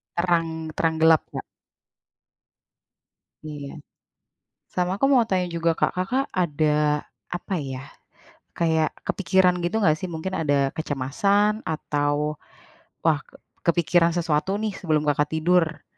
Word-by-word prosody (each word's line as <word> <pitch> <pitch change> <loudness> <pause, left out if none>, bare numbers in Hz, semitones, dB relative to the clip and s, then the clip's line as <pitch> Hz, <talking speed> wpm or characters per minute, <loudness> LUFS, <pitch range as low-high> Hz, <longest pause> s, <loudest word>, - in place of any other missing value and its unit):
Terang 165 -2 0
terang 160 -1 +1
gelap, 160 -1 +6
Kak? - - -4 2.0
Iya. 145 -2 -7 0.9
Sama 180 0 -1
aku 275 - +3
mau 250 -5 +5
tanya 185 -4 0
juga 170 0 +1
Kak, - - +1
Kakak 220 +9 0
ada, 150 -3 +1 0.2
apa 175 +3 -4
ya, 135 -3 -5 0.7
kayak 160 -2 +2 0.2
kepikiran 185 -1 +2
gitu, 175 +4 -1
nggak 155 -7 +4
sih? 185 - -4
Mungkin, 170 +3 -5
ada 140 -3 +1
kecemasan? 200 +10 +1
Atau, 150 -1 -1 0.6
"Wah, 155 -3 +2 0.4
kepikiran 170 0 +3
sesuatu 170 +3 0
nih?" 215 -2 -2
Sebelum 155 -5 0
Kakak 145 0 +1
tidur? 165 0 +1
165 Hz, 115 wpm, -24 LUFS, 150-180 Hz, 2.0 s, gelap